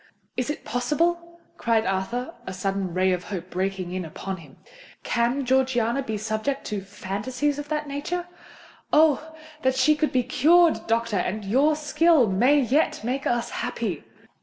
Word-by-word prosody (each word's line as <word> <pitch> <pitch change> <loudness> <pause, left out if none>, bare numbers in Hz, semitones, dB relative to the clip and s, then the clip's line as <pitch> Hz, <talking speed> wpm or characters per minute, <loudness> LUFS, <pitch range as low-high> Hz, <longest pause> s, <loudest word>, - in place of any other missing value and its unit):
"Is 250 +1 -2
it 295 - -4
possible?" 340 +8 -1 0.2
cried 225 -1 +1
Arthur, 230 - -2
a 190 - -4
sudden 195 0 -2
ray 185 +2 +2
of 180 -1 -2
hope 180 -2 -6
breaking 185 -1 -2
in 185 0 -2
upon 190 +4 -6
him. 150 -6 -15 0.5
"Can 240 +3 0
Georgiana 255 -1 +2
be 220 -5 -3
subject 220 +6 -2
to 210 -3 -3
phantasies 210 +9 -3
of 290 0 -7
that 300 -1 -2
nature? 300 +5 -3 0.7
Oh! 315 +1 +3 0.3
then 260 0 +2
she 285 +4 +4
can 305 0 +1
be 255 -1 +1
cured, 325 +7 +4
doctor—and 215 -3 0
your 275 +9 +3
skill 305 -1 +3
may 245 +10 +4
yet 275 -1 +1
make 260 +4 -2
us 240 0 0
happy!" - - -3
245 Hz, 155 wpm, -25 LUFS, 195-295 Hz, 0.7 s, she